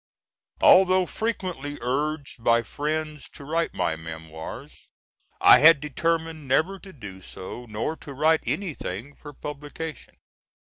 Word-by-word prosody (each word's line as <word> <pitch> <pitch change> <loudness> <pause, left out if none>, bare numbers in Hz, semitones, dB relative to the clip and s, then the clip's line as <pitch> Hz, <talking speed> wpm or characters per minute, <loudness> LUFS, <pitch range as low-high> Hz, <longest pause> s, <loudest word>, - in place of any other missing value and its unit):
Although 185 0 +6
frequently 180 -9 -3
urged 140 +1 -2
by 115 0 +4
friends 150 +3 -3
to - - -11
write 165 +3 -1
my 80 - 0
memoirs 80 0 -9 0.5
I - - +8
had 155 0 +8
determined 160 +1 -2
never 175 +9 +1
to 195 - -12
do 105 - -10
so, 105 +7 -8
nor 110 +8 -3
to 140 - -10
write 155 +3 +3
anything 145 - -3
for 145 - -11
publication. 150 +1 -7
150 Hz, 125 wpm, -25 LUFS, 120-160 Hz, 0.5 s, I